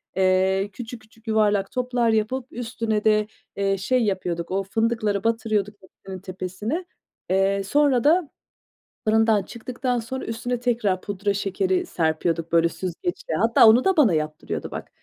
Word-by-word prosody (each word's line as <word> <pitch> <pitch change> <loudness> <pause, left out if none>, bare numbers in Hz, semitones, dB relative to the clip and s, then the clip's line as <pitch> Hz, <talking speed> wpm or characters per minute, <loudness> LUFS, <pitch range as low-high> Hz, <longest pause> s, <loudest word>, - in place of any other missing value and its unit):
eee, 190 +1 +2
küçük 240 -1 -8
küçük 220 +1 -24
yuvarlak 210 -3 +2
toplar 250 -2 0
yapıp 225 +4 0
üstüne 225 -4 -2
de, 215 -1 +3 0.3
eee, 195 0 0
şey 245 +6 +1
yapıyorduk 180 -4 -2
o 195 +1 0
fındıkları 215 -1 0
batırıyorduk 215 -3 0
hepsinin 190 0 -11
tepesine. 190 - -4 0.4
Eee, 195 +1 +2
sonra 265 +3 +2
da 315 0 +3 0.8
fırından 220 -1 +3
çıktıktan 245 +3 -3
sonra 245 +4 -5
üstüne 235 +2 -3
tekrar 225 -6 0
pudra 200 +1 -2
şekeri 190 -1 0
serpiyorduk, 165 0 -1
böyle, 170 0 +4
süzgeçle. 350 - -4
Hatta 230 0 +6
onu 235 +3 +6
da 385 -2 +3
bana 240 - +5
yaptırıyordu 155 0 -3
bak. - - -7
215 Hz, 140 wpm, -24 LUFS, 190-235 Hz, 0.8 s, Hatta